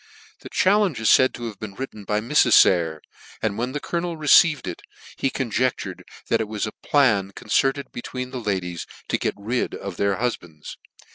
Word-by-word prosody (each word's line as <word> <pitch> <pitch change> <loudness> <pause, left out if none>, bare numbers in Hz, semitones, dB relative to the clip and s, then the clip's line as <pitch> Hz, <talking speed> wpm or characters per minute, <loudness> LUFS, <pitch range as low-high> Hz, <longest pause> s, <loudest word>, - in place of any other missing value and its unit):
The - - -11
challenge 195 - +2
is 110 - +3
faid 130 0 +5
to 120 - -8
have 110 -3 -7
been 105 -3 -7
written 110 -5 -7
by 105 +2 0
Mrs. 120 -1 +3
Sayer, 80 -4 +4 0.4
and 110 -2 -1
when 120 +4 -2
the 145 - -2
colonel 170 +1 -3
received 155 0 +5
it, 85 - -6 0.3
he 135 - 0
conjectured 130 -1 -2 0.2
that - - +2
it 110 - -3
was 105 0 -3
a 110 - -5
plan 110 -11 +2
concerted 135 +1 0
between 125 +1 -6
the 130 -2 -5
ladies 95 -5 -3 0.2
to - - 0
gtc - - -1
rid 115 +5 -2
of 95 -3 -7
their 100 -1 +1
hufbands. 85 -10 -5
115 Hz, 185 wpm, -23 LUFS, 100-135 Hz, 0.4 s, faid